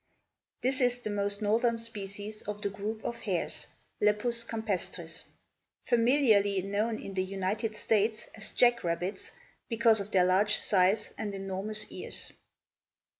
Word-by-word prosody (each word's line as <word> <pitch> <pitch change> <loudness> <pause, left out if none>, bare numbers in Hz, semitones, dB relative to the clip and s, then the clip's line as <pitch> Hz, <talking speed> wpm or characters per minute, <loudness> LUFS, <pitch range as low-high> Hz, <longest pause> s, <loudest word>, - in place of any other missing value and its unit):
This 265 +2 +1
is 245 -1 +3
the 230 -4 -5
most 205 +1 -1
northern 230 +3 +3
species 210 -2 -7
of 210 +1 -6
the 200 - 0
group 215 +2 -4
of 235 - -2
hares 185 -7 -2 0.3
(Lepus 230 +3 +2
campestris), 185 -7 -3 0.6
familiarly 230 -6 +4
known 210 +3 0
in 195 - -7
the 185 -1 0
United 195 +4 -2
States 215 +1 +1
as 215 - -6
jack 240 -1 +4
rabbits 175 +3 -2 0.4
because 230 -1 +4
of 200 0 -4
their 185 -4 +4
large 200 +3 +4
size 195 +2 +2
and 205 -2 -3
enormous 195 +2 -3
ears. - - -4
210 Hz, 135 wpm, -30 LUFS, 195-225 Hz, 0.6 s, familiarly